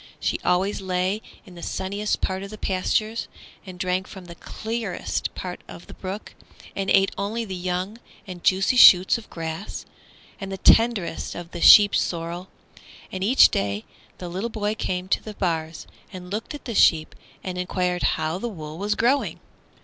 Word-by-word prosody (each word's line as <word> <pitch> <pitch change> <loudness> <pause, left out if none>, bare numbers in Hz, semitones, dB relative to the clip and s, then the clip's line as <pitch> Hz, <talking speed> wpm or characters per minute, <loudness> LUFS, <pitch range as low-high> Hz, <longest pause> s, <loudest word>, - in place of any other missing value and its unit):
She - - -1
always 190 +3 +1
lay 185 +2 -1 0.2
in 185 - -14
the 175 - -11
sunniest 200 +4 -2
part 190 0 -2
of 200 - -7
the 215 - -9
pastures, 215 +4 -1 0.4
and 185 -1 -9
drank 185 +1 -1
from 190 -3 -11
the 170 - -10
clearest 220 +2 -4
part 180 -1 -6
of 170 - -11
the - - -12
brook, 195 +3 -7 0.4
and 195 -1 -2
ate 195 0 +4
only 220 +4 -2
the 195 - -6
young 185 +4 -3 0.3
and 180 -3 -9
juicy 195 +6 +2
shoots 190 0 +8
of 225 - -15
grass 165 +3 -6 0.5
and 195 -2 -6
the 195 - -4
tenderest 200 -5 +2
of 175 0 -8
the 175 - -7
sheep 205 -1 +9
sorrel. 170 +2 -2 0.6
And 185 0 -4
each 245 +7 +6
day 100 +1 -2 0.3
the 180 - -7
little 190 +7 -3
boy 210 -2 -2
came 185 -3 -3
to - - +1
the 215 -1 -8
bars 165 -4 -2 0.3
and 180 -1 -9
looked 220 +8 -4
at 290 - -11
the 235 - -4
sheep 160 -6 +4 0.3
and 180 -1 -4
enquired 180 0 -1 0.2
how 160 +3 -2
the 240 - -3
wool 155 -5 -8
was 205 +1 0
growing. 260 +5 +1
190 Hz, 175 wpm, -24 LUFS, 180-210 Hz, 0.6 s, sheep